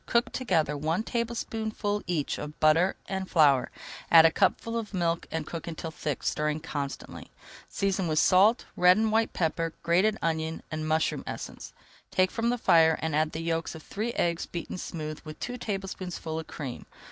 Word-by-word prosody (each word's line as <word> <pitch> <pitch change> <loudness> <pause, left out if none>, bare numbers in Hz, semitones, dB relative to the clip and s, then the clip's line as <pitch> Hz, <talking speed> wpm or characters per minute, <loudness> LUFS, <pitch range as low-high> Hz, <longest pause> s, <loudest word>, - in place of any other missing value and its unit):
Cook 235 0 +2
together 160 - 0
one 160 +7 -1
tablespoonful 220 -3 -2
each 165 -5 -1
of 150 0 -7
butter 165 +4 +4
and 190 -1 -3
flour, 145 -6 +4 0.4
add 165 -1 +9
a 165 - +6
cupful 230 +7 +1
of 215 -3 -4
milk, 170 -2 0
and 160 -1 -3
cook 165 +1 -6
until 165 0 -5
thick, 150 -3 -4
stirring 150 0 0
constantly. 145 -3 -6 0.4
Season 195 -2 0
with 155 -1 0
salt, 200 +9 +5
red 180 +1 +6
and 220 0 +2
white 225 +1 +2
pepper, 165 -1 -1
grated 190 +6 +3
onion, 160 0 -2
and 155 0 -3
mushroom 160 +1 +1
essence. - - -7 0.4
Take 185 0 +2
from 230 +1 0
the 245 - +1
fire, 160 -7 +5
and 160 -2 -1
add 155 0 +2
the 160 - -4
yolks 165 -1 -2
of 160 - -10
three 220 +4 -3
eggs 170 -5 0
beaten 175 +1 -5
smooth 155 -3 -5
with 155 -1 -9
two 245 - -4
[Page 245 - -8
285] - - -6
tablespoonfuls 185 -5 -4
of - - -14
cream. 135 -5 -7
165 Hz, 180 wpm, -28 LUFS, 155-200 Hz, 0.4 s, add